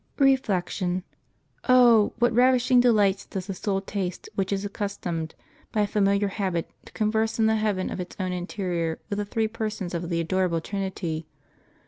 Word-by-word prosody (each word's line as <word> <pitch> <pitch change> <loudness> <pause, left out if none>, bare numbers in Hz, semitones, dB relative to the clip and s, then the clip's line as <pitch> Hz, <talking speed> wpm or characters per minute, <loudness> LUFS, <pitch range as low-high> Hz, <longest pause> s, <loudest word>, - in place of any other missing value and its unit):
Reflection. 190 -9 +1 0.3
— - - -23
Oh! 240 -4 +6
what 240 0 +2
ravishing 250 +1 +4
delights 205 -5 +3
does 190 -2 -5
the 200 - -5
s. 185 - -11
ul 195 -1 +1
taste 190 -2 -4
which 195 0 -1
is 200 0 -1
accustomed, 190 -6 -4 0.4
by 215 - +1
a - - +3
familiar 200 0 +2
habit, 190 -4 -2 0.2
to 220 - -4
eon 215 - +2
erse 220 0 +1
in 225 - +3
the 220 0 +3
heaven 210 -4 -1
of - - -4
its 180 -1 -6
own 185 -1 -1
interior 175 -3 -2
with 200 - -1
the 205 - -1
Three 220 +2 0
Persons 215 -4 -4
of 170 0 -3
the 170 -1 0
adorable 175 0 +1
Trinity! 175 -4 -4
200 Hz, 180 wpm, -26 LUFS, 180-220 Hz, 0.4 s, Oh